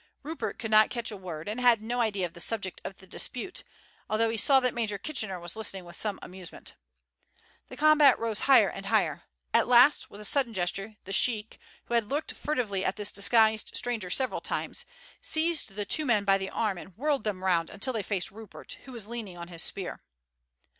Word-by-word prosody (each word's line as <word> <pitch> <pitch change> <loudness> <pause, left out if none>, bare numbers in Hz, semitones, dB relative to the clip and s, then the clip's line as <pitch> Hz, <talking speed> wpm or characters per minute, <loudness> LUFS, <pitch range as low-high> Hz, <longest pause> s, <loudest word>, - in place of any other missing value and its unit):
Rupert 315 +3 -4
could 220 -2 -5
not 215 0 +6
catch 235 -2 -3
a - - -6
word, 175 -4 -7
and 220 +4 -3
had 240 -3 +5
no 240 +3 -2
idea 205 -5 0
of 170 - -7
the 170 - -12
subject 190 0 -1
of 195 - -7
the 190 - -15
dispute, 250 - -2 0.5
although 225 +1 +2
he - - -2
saw 270 +5 +6
that 250 -1 0
Major 220 -4 -2
Kitchener 210 -6 -3
was 175 +2 -4
listening 195 -4 -3
with 175 - -11
some 210 -2 -1
amusement. 180 -1 -9 1.0
The - - -10
combat 300 -3 +6
rose 225 -2 -1
higher 270 - +8
and - - -7
higher. - - +1 0.3
At - - +4
last, 250 +4 +5
with 205 - -12
a 210 - -2
sudden 240 -1 +1
gesture, 195 +4 -2
the 195 - -6
sheik, 215 +2 +1 0.3
who - - -6
had 230 -3 +1
looked 295 +3 -1
furtively 225 -10 -2
at 190 - 0
this 210 -1 0
disguised 220 +1 +3
stranger 230 -7 -2
several 260 +7 -1
times, - - -3 0.4
seized 315 - +1
the 205 -1 -3
two 305 +8 0
men 215 -4 +3
by 195 -1 +3
the 190 0 -4
arm 210 -5 -1
and 185 +1 -13
whirled 285 -1 0
them 195 -4 -3
round 170 -3 +2
until 255 +6 -2
they 220 - -1
faced 195 -2 -2
Rupert, 220 0 -9
who 265 - -10
was 225 -4 -5
leaning 220 -6 -6
on 170 0 -8
his 170 -2 -3
spear. 190 0 -4
215 Hz, 210 wpm, -28 LUFS, 195-245 Hz, 1.0 s, higher